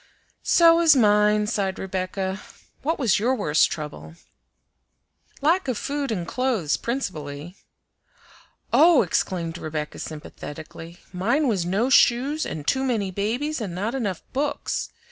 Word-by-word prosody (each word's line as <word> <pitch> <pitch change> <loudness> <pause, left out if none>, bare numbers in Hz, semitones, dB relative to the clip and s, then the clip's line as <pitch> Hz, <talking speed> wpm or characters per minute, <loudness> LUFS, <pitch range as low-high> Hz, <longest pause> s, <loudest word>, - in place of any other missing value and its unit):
"So 335 -1 +5
was 330 -3 +6
mine," 210 -2 +4
sighed 200 -3 -1
Rebecca. 190 0 -3 0.4
"What 320 +4 -1
was 235 -9 +2
your 245 +5 +1
worst 160 -9 +2
trouble?" 80 - -7 1.3
"Lack 340 +4 +2
of 250 -4 -1
food 280 -2 -3
and 175 -6 -3
clothes 235 - 0
principally." 165 - -5 1.2
"Oh!" 305 +2 +6
exclaimed 170 -2 -2
Rebecca 155 -1 -5
sympathetically, 160 +2 -9 0.2
"mine 235 +12 +1
was 190 -7 0
no 215 +8 0
shoes 270 +6 +3
and 150 -2 -6
too 265 - +1
many 220 -7 -1
babies 240 +10 -2
and 190 -5 -4
not 210 +6 -2
enough 205 -10 -3
books. 285 +2 -2
210 Hz, 125 wpm, -24 LUFS, 175-265 Hz, 1.3 s, was